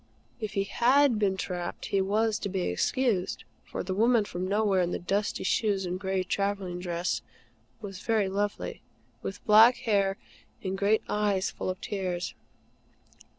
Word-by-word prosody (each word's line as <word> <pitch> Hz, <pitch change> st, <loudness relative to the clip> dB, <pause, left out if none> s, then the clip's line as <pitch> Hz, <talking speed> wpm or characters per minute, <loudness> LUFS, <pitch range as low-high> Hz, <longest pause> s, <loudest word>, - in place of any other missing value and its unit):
If 215 Hz, -3 st, -4 dB
he 195 Hz, -2 st, +1 dB
HAD 250 Hz, +3 st, +3 dB
been 195 Hz, -2 st, +1 dB
trapped, 175 Hz, -2 st, -4 dB
he 195 Hz, -, +4 dB
was 215 Hz, +3 st, +1 dB
to 200 Hz, -, -3 dB
be 190 Hz, -1 st, -2 dB
excused; 185 Hz, -, 0 dB, 0.2 s
for -, -, -5 dB
the 185 Hz, -, -3 dB
woman 225 Hz, +2 st, +3 dB
from 180 Hz, -1 st, -4 dB
nowhere, 200 Hz, -1 st, +2 dB
in 175 Hz, -, +1 dB
the -, -, -2 dB
dusty 200 Hz, +4 st, -1 dB
shoes, 195 Hz, 0 st, +1 dB
and 180 Hz, +1 st, -3 dB
gray 190 Hz, -1 st, -1 dB
travelling 195 Hz, -2 st, -2 dB
dress, 175 Hz, -1 st, -2 dB, 0.6 s
was 195 Hz, -3 st, -7 dB
very 215 Hz, -2 st, +1 dB
lovely, 205 Hz, +2 st, -2 dB, 0.4 s
with 195 Hz, -, -6 dB
black 220 Hz, +3 st, +8 dB
hair 200 Hz, -3 st, +2 dB, 0.5 s
and 190 Hz, -1 st, -2 dB
great 200 Hz, +3 st, +2 dB
eyes 205 Hz, -2 st, +1 dB
full -, -, -4 dB
of 185 Hz, 0 st, -3 dB
tears. 185 Hz, -3 st, -3 dB
195 Hz, 155 wpm, -28 LUFS, 185-215 Hz, 0.6 s, black